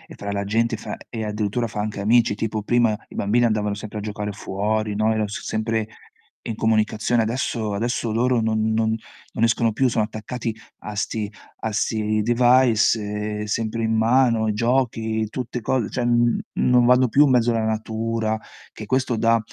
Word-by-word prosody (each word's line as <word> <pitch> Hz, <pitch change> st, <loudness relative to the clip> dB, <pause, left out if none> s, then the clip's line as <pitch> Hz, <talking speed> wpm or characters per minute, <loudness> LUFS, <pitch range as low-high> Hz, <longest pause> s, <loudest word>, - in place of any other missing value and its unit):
fra 100 Hz, 0 st, -5 dB
la 100 Hz, 0 st, -2 dB
gente, 115 Hz, +3 st, 0 dB
e -, -, -8 dB
fa -, -, -6 dB
e 110 Hz, -2 st, -5 dB
addirittura 105 Hz, +2 st, -1 dB
fa 105 Hz, -, -6 dB
anche 105 Hz, -1 st, -3 dB
amici, 115 Hz, +1 st, +4 dB
tipo 110 Hz, 0 st, -3 dB
prima 115 Hz, -1 st, +2 dB
i -, -, -13 dB
bambini 115 Hz, +4 st, +2 dB
andavano 105 Hz, -2 st, 0 dB
sempre 105 Hz, +1 st, -6 dB
a -, -, -5 dB
giocare 105 Hz, 0 st, -4 dB
fuori, 105 Hz, +2 st, -2 dB
no, 110 Hz, +1 st, +2 dB
era 110 Hz, -1 st, 0 dB
so 105 Hz, -, -6 dB
sempre 110 Hz, 0 st, -1 dB, 0.6 s
in 115 Hz, -, -3 dB
comunicazione. 110 Hz, +1 st, +1 dB
Adesso 110 Hz, -2 st, -2 dB
adesso 120 Hz, +1 st, -1 dB
loro 120 Hz, +2 st, +2 dB
non 110 Hz, 0 st, 0 dB
non 110 Hz, 0 st, +1 dB, 0.4 s
non 115 Hz, -, -1 dB
escono 115 Hz, 0 st, +2 dB
più, 130 Hz, +4 st, +2 dB
sono 115 Hz, -3 st, +1 dB
attaccati 110 Hz, +2 st, -5 dB, 0.3 s
a 105 Hz, 0 st, -7 dB
'sti 105 Hz, 0 st, -2 dB, 0.3 s
a 110 Hz, -, -3 dB
sti 110 Hz, 0 st, 0 dB
device, 120 Hz, -1 st, +4 dB, 0.4 s
ehm, 105 Hz, -, -3 dB
sempre 110 Hz, +1 st, -2 dB
in 110 Hz, 0 st, +1 dB
mano, 115 Hz, -1 st, +3 dB
giochi, 110 Hz, -2 st, 0 dB
tutte 125 Hz, 0 st, -4 dB
co 120 Hz, -1 st, 0 dB
cioè, 125 Hz, -, -2 dB
mhmm, 120 Hz, 0 st, +2 dB
non 125 Hz, -1 st, +3 dB
vanno 125 Hz, +1 st, +5 dB
più 145 Hz, +6 st, +5 dB
in 140 Hz, -, +2 dB
mezzo 120 Hz, -1 st, +3 dB
alla 115 Hz, -1 st, 0 dB
natura, 110 Hz, 0 st, -1 dB, 0.4 s
che 110 Hz, -, -8 dB
questo 130 Hz, -1 st, +1 dB
dà 115 Hz, +1 st, +3 dB
110 Hz, 180 wpm, -22 LUFS, 110-120 Hz, 0.6 s, vanno